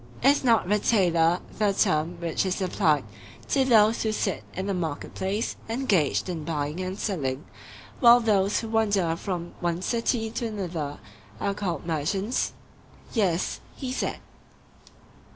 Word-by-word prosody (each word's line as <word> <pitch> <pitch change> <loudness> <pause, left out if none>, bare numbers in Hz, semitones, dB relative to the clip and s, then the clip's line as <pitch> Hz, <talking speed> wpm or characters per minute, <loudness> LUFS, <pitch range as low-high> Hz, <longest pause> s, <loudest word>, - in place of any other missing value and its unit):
Is 275 +2 +4
not 230 -7 +3
'retailer' 180 -5 +3 0.2
the 205 -2 +3
term 165 -1 +1
which 170 -2 -1
is 190 -1 -1
applied 170 -6 +2 0.5
to 270 - +3
those 225 -3 +4
who 220 - 0
sit 205 -2 -1
in 190 - -3
the 200 - -1
market 165 -5 -4
place 200 +4 -2
engaged 215 - +1
in 170 -4 -4
buying 150 0 -3
and 185 +1 -3
selling, 145 -9 -2 0.5
while 240 -1 +8
those 205 -3 +2
who 225 - -6
wander 205 -7 +2
from 175 -1 -4
one 175 +1 -1
city 230 -1 0
to 235 - -2
another 170 -9 -4 0.4
are 200 - 0
called 180 -7 -3
merchants? 185 - -1 0.6
Yes, 190 -7 0 0.2
he 260 -3 -5
said. 255 - -2
190 Hz, 140 wpm, -26 LUFS, 170-220 Hz, 0.6 s, while